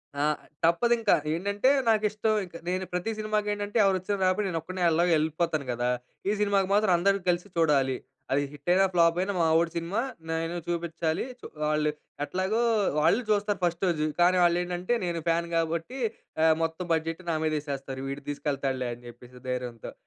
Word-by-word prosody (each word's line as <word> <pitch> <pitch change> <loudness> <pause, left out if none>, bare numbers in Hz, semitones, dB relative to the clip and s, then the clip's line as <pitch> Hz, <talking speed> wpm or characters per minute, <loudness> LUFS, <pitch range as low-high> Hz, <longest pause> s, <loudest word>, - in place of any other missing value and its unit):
ఆ! 145 - 0 0.4
తప్పదు 175 +9 +3
ఇంకా. 225 - +4 0.2
ఏంటంటే 200 +8 +1 0.2
నాకు 215 -1 +3
ఇష్టం 215 +1 0
ఇంక. 175 - -16
నేను 185 +1 -1
ప్రతి 180 +5 -1
సినిమాకి 215 -1 -1
ఏంటంటే 205 +2 -3
ఎవరు 195 -1 +3
వచ్చినా 200 +2 -2
రాకపోయినా, 185 +2 +1
నేను 165 -2 -1
ఒక్కడినే 185 +2 -4
ఎలాగూ 170 +2 +2
వెళ్ళిపోతాను 155 -1 0
గదా! 120 +1 -1 0.4
ఈ - - +3
సినిమాకి 200 -2 +2
మాత్రం 210 -1 +3
అందరం 195 +3 +2
కలిసి 175 +2 0
చూడాలి. 140 -5 +3 0.3
అది 140 - +3
హిట్ 145 +2 -7
అయినా 190 +2 +5
ఫ్లాప్ 170 0 +4
అయినా 200 +1 -1
మా - - +3
వోడి 165 0 +1
సినిమా 170 +6 -2 0.3
నేను 165 +1 -2
చూపించాలి. 170 -1 -1
చు - - -12 0.2
వాళ్ళు 150 0 +1 0.3
ఎట్లాగో 190 +9 -1 0.4
వాళ్ళు 165 +10 +4
చూస్తారు 205 -1 +1
ఫస్ట్ 175 +1 0
రోజు. 155 -3 +1 0.2
కానీ 180 +1 +5
వాళ్ళు 175 0 +4
ఏంటంటే 180 +5 -2
నేను 170 -1 -2
ఫ్యాన్ 170 +1 +1
కాబట్టి 165 +9 -2 0.5
ఆహ్, 160 -1 +5
మొత్తం 165 +2 -2
బడ్జెట్ 165 +2 -2
నా 165 - +1
మీద 155 - +1
వేసేస్తారు. 135 -2 -5
వీడు 140 +1 -5
తీసుకెళ్తాడులే 135 -3 -2
అని 120 - -13
చెప్పేసి 125 +1 -13
ధైర్యంతో. 125 -2 -4
170 Hz, 175 wpm, -27 LUFS, 155-195 Hz, 0.5 s, అయినా